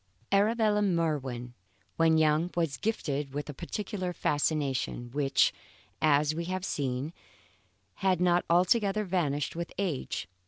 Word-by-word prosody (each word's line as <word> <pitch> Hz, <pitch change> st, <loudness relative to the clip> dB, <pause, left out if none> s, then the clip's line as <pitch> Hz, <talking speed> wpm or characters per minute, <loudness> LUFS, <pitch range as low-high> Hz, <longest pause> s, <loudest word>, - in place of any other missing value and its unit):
Arabella 210 Hz, +1 st, +3 dB
Merwin, 145 Hz, -10 st, -1 dB, 0.4 s
when 165 Hz, -1 st, +4 dB
young, 155 Hz, +2 st, +3 dB
was 165 Hz, -6 st, 0 dB
gifted 145 Hz, -10 st, -2 dB
with 145 Hz, -, -3 dB
a -, -, -11 dB
peculiar 185 Hz, -, -4 dB
fascination 145 Hz, -6 st, -1 dB
which, 140 Hz, 0 st, +2 dB, 0.5 s
as 150 Hz, 0 st, +3 dB
we 170 Hz, +2 st, -3 dB
have 185 Hz, +1 st, -3 dB
seen, 135 Hz, +1 st, -2 dB, 0.9 s
had 190 Hz, -2 st, +2 dB
not 175 Hz, -1 st, +3 dB
altogether 195 Hz, +4 st, +3 dB
vanished 160 Hz, -7 st, -1 dB
with 170 Hz, 0 st, -4 dB
age. 180 Hz, -9 st, -2 dB
165 Hz, 120 wpm, -29 LUFS, 145-185 Hz, 0.9 s, when